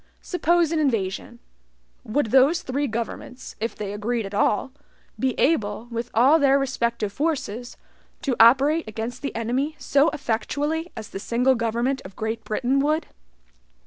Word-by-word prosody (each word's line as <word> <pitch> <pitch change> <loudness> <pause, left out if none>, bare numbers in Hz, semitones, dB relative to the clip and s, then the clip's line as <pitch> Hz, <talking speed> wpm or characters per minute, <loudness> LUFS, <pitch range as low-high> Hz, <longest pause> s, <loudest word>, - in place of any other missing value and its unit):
Suppose 345 -2 +2
an 325 - +1
invasion; 230 -5 -1 0.7
would 225 0 -1
those 280 +7 +4
three 280 +1 -1
governments 235 +2 -6
(if 230 +2 -3
they 205 -1 -5
agreed 220 +2 -2
at 195 - -8
all) 210 +5 +1 0.5
be 260 -2 0
able, 220 -6 +1
with 235 +1 -3
all 270 +8 +6
their 275 -1 +4
respective 235 -6 -1
forces, 255 -5 -3 0.5
to 270 -6 0
operate 275 +7 +5
against 225 +3 -5
the 280 - -4
enemy 255 +7 -1
so 285 +1 +3
effectually 290 +7 -2
as 220 -2 -7
the 195 - -6
single 245 +5 +2
government 235 +3 -1
of 185 0 -11
Great 220 +1 -3
Britain 255 +5 0
would? 305 +3 +1
250 Hz, 145 wpm, -24 LUFS, 225-285 Hz, 0.7 s, all